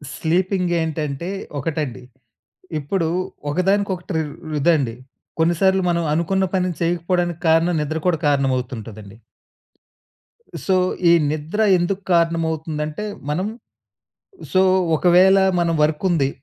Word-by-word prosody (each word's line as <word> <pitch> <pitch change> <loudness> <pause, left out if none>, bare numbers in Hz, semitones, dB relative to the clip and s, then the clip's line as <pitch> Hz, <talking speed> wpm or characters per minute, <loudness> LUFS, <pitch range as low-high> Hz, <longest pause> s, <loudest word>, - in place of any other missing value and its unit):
Sleeping 180 +2 0
ఏంటంటే, 155 0 -3 0.3
ఒకటండి. 145 -5 -3 0.8
ఇప్పుడు 165 +4 -1 0.4
ఒకదానికొకటి 190 +2 0 0.4
రు 155 - -3
ఇదండి. 140 -7 +2 0.4
కొన్ని 165 +2 +3
సార్లు 190 0 +4
మనం 170 -1 +1
అనుకున్న 190 +4 +1
పని 185 -1 +1
చేయకపోవడానికి 175 0 0
కారణం, 165 +2 +3
నిద్ర 155 +2 -2
కూడా 170 -3 +1
కారణం 140 -2 +2
అవుతుంటదండి... 110 -4 -8 1.5
సో, 190 - +2 0.3
ఈ - - +7 0.2
నిద్ర 155 +7 -3 0.2
ఎందుకు 185 +3 -1
కారణమవుతుందంటే 160 -1 0 0.3
మనం 180 +7 -1 1.1
సో, 185 - +5 0.3
ఒకవేళ 180 +4 +5 0.2
మనం 170 -1 +1
వర్క్ 150 +2 0
ఉంది. 150 -6 +2
165 Hz, 105 wpm, -21 LUFS, 150-180 Hz, 1.5 s, ఈ